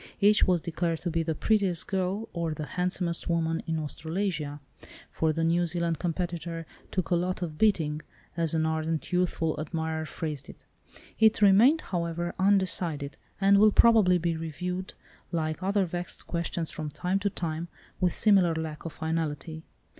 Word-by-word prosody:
Each 210 +1 +5
was 180 -3 +3
declared 170 0 -1
to 175 - -2
be 165 +1 +1
the 160 -1 -1
prettiest 195 -3 +1
girl, 195 +3 -1
or 165 -3 -2
the 150 - -4
handsomest 180 0 -2
woman 165 -1 0
in 160 0 0
Australasia—for 155 -1 -4
the 165 +1 -1
New 170 +1 +2
Zealand 170 -2 0
competitor 170 0 -3 0.2
"took 185 -1 -2
a - - +5
lot 180 +1 -1
of 155 -3 -6
beating," 160 -8 +2 0.3
as 165 -1 +1
an 160 0 +2
ardent 160 +1 -2
youthful 175 -3 +1
admirer 160 0 -3
phrased 150 -4 -5
it. - - -14 0.5
It 220 -1 +5
remained, 230 +11 +6
however, 170 -1 -3
undecided, 180 -7 +1 0.2
and 200 0 +5
will 215 +1 +7
probably 210 -5 +6
be 170 -1 -1
revived, 180 +4 -4 0.4
like 155 -1 -2
other 195 +1 +1
vexed 175 0 -4
questions 170 -1 -3
from 155 -1 -5
time 180 +6 -1
to 200 0 0
time, 165 -2 -3 0.3
with 180 -2 +2
similar 190 -6 +4
lack 160 -1 -5
of 165 - -5
finality. 160 0 -3
170 Hz, 155 wpm, -28 LUFS, 160-185 Hz, 0.5 s, will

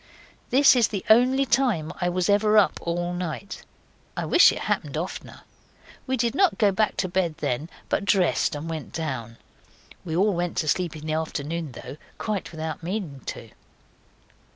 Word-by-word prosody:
This 270 +1 +6
is 240 -3 +4
the 200 -3 -5
only 255 +4 +5
time 230 - +1
I 175 - +1
was 180 0 0
ever 210 +1 +3
up 205 - +4
all 175 +1 -2
night. 180 +2 -5 0.6
I - - -2
wish - - +6
it - - -5
happened - - -2
oftener. - - -6 0.7
We 260 0 0
did 235 -1 0
not 370 +4 +3
go 205 -4 +4
back 215 +2 0
to 185 - 0
bed 180 -3 0
then, 145 +1 -2 0.2
but - - 0
dressed 190 -6 +2
and 145 +3 -6
went 160 -2 -6
down. 130 -8 -4 0.7
We 160 -2 -4
all 200 +4 +3
went 175 0 -2
to 155 - 0
sleep 175 +1 0
in 155 0 -9
the 155 - -2
afternoon, 160 -1 -3
though. 140 - -9 0.2
Quite 210 -3 -3
without 160 -1 -5
meaning 170 -6 -4
to. - - -7
175 Hz, 175 wpm, -25 LUFS, 160-215 Hz, 0.7 s, This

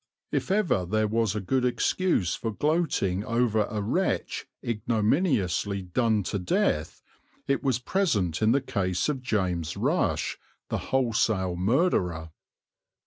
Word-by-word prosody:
If - - -1
ever 190 - +2
there 110 +4 0
was 110 0 0
a - - 0
good 125 +7 0
excuse 125 - +1
for 115 - -3
gloating 140 - 0
over 115 -2 +1
a 105 0 -4
wretch 110 - -1 0.2
ignominiously 110 - 0
done 110 +3 +1
to 100 - -2
death 80 -3 0 0.4
it 140 - +1
was 130 -4 +2
present 115 - 0
in 110 +1 +4
the 135 +3 +3
case 95 -4 -1
of 135 -3 -2
James 90 -8 -1
Rush - - 0 0.3
the - - -1
wholesale 110 -7 +1
murderer. 90 - +1
110 Hz, 130 wpm, -27 LUFS, 95-130 Hz, 0.4 s, in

